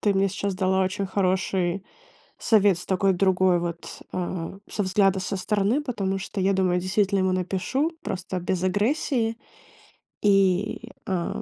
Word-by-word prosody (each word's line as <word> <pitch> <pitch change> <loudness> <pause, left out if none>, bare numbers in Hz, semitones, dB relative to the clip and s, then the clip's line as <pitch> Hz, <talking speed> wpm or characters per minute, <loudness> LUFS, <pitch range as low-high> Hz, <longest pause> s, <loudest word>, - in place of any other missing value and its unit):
ты 205 - +2
мне 195 0 +2
сейчас 200 0 -3
дала 190 0 +2
очень 190 +1 -1
хороший 185 -1 0 0.5
совет 205 -4 +4
с 180 - -8
такой 195 0 +2
другой 185 -1 +3
вот, 170 -1 -6
а, 180 -1 -3
со 205 - -1
взгляда 195 0 +2
со 190 +1 -3
стороны, 205 +7 +1
потому 200 -9 -2
что 195 +1 -5
я 190 +1 +2
думаю, 185 -2 +2
действительно 195 +2 +1
ему 185 0 +2
напишу, 190 - -1
просто 185 0 -4
без 180 0 -2
агрессии, 225 +4 0 0.9
и, 200 +2 +2 0.2
а, 185 -5 -2
190 Hz, 145 wpm, -25 LUFS, 185-200 Hz, 0.9 s, совет